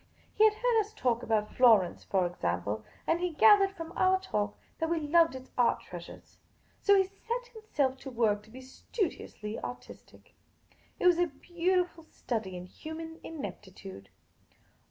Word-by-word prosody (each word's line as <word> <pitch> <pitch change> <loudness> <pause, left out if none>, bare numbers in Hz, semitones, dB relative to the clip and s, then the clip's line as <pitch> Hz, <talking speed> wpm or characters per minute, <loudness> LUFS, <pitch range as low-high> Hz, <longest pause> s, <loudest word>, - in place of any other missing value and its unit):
He 430 - +3
had 430 -1 +4
heard 475 0 +2
us 430 0 -3
talk 240 - +1
about 215 -2 0
Florence, 220 -8 +4
for 190 -2 +1
example, 105 - -2 0.2
and 330 - +1
he 360 0 0
gathered 405 +3 +6
from 330 -2 -8
our 375 0 +3
talk 210 - -2 0.2
that 325 - 0
we 335 -1 +1
loved 325 0 +3
its 260 0 -10
art 245 - +4
treasures. 175 -1 -11 0.4
So 405 - +5
he 385 - +5
set 460 +6 -5
himself 290 - -1
to 265 - -8
work 225 -4 +1
to 215 - -20
be 255 +4 -11
studiously 260 - -4
artistic. 250 - -10 0.7
It - - -1
was 350 -1 +6
a 350 - +3
beautiful 345 +3 -1
study 215 - -4
in 180 - -7
human 320 - -8
ineptitude. 195 - -8
295 Hz, 155 wpm, -30 LUFS, -, 0.7 s, gathered